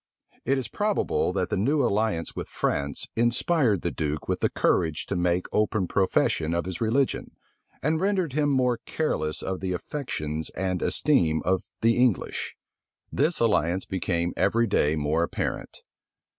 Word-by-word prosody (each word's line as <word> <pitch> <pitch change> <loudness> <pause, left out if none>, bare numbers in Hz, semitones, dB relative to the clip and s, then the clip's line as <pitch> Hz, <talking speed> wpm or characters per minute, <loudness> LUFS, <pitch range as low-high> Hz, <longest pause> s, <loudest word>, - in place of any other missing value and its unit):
It 135 - +2
is 130 - -3
probable 210 - 0
that 95 -1 -1
the - - +2
new 140 +8 +2
alliance 105 -6 0
with - - -5
France 70 0 -2
inspired 120 - +2
the 85 - 0
duke 75 -1 -3
with - - -1
the - - +2
courage 80 -2 +1
to - - -3
make 90 0 +1
open 105 -3 +1
profession 85 -4 +1
of 85 - -1
his 90 -2 -5
religion, 125 +4 0 0.5
and 155 +3 +1
rendered 190 -7 0
him 145 0 +2
more 125 -3 +2
careless 80 - -1
of 95 -1 -3
the 95 -1 -2
affections 80 - -4
and 95 -1 -1
esteem 90 - +2
of 95 0 +1 0.2
the 115 0 +3
English. 125 -5 0 0.6
This 155 +4 +1
alliance 95 -5 +2
became 85 -2 -1
every 115 +1 +2
day 80 -8 +2
more 75 +2 0
apparent. 85 - -3
95 Hz, 155 wpm, -26 LUFS, 85-130 Hz, 0.6 s, the